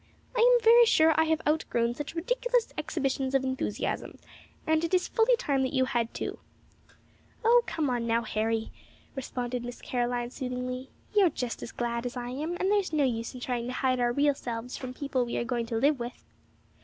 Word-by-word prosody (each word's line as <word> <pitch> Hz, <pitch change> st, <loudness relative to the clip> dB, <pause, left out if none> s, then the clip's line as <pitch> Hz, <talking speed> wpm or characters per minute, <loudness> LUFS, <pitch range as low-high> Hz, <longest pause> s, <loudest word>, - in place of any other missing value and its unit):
"I -, -, 0 dB
am 485 Hz, 0 st, +5 dB
very 470 Hz, +1 st, +7 dB
sure 320 Hz, -5 st, +5 dB
I 320 Hz, -, +4 dB
have 320 Hz, 0 st, 0 dB
outgrown 240 Hz, -6 st, +1 dB
such 295 Hz, +5 st, -6 dB
ridiculous -, -, 0 dB
exhibitions 270 Hz, -3 st, -1 dB
of 270 Hz, -, +3 dB
enthusiasm, 260 Hz, 0 st, -3 dB, 0.5 s
and 315 Hz, +1 st, +2 dB
it 335 Hz, +2 st, +1 dB
is 365 Hz, -, +1 dB
fully 460 Hz, +2 st, +3 dB
time 280 Hz, -, 0 dB
that 260 Hz, +1 st, -1 dB
you 260 Hz, -1 st, +3 dB
had 235 Hz, -2 st, -1 dB
too." -, -, -5 dB, 1.1 s
"O, 480 Hz, +1 st, +6 dB
come 320 Hz, -2 st, -1 dB, 0.2 s
now, 230 Hz, 0 st, +2 dB
Harry," 220 Hz, +1 st, -1 dB, 0.4 s
responded 250 Hz, -2 st, -3 dB
Miss 245 Hz, 0 st, -7 dB
Caroline, 245 Hz, -1 st, -2 dB
soothingly. 255 Hz, 0 st, -4 dB, 0.2 s
"You're 400 Hz, -4 st, +5 dB
just 250 Hz, -5 st, -4 dB
as -, -, -6 dB
glad 235 Hz, 0 st, -2 dB
as 245 Hz, -, -7 dB
I 245 Hz, 0 st, -4 dB
am, 305 Hz, +7 st, -3 dB
and 380 Hz, +2 st, +1 dB
there's 405 Hz, -4 st, +1 dB
no 305 Hz, -2 st, +2 dB
use 230 Hz, -2 st, -1 dB
in 250 Hz, -, -8 dB
trying 245 Hz, -1 st, -2 dB
to 250 Hz, -, -3 dB
hide 255 Hz, -1 st, +1 dB
our 240 Hz, 0 st, +2 dB
real 285 Hz, +3 st, +3 dB
selves 240 Hz, -2 st, -5 dB
from 255 Hz, -1 st, -6 dB
people 275 Hz, -3 st, -1 dB
we 240 Hz, -, -3 dB
are -, -, -1 dB
going 235 Hz, -1 st, -2 dB
to 230 Hz, -, -3 dB
live 280 Hz, +3 st, +3 dB
with." 240 Hz, +1 st, -6 dB
260 Hz, 195 wpm, -28 LUFS, 240-320 Hz, 1.1 s, very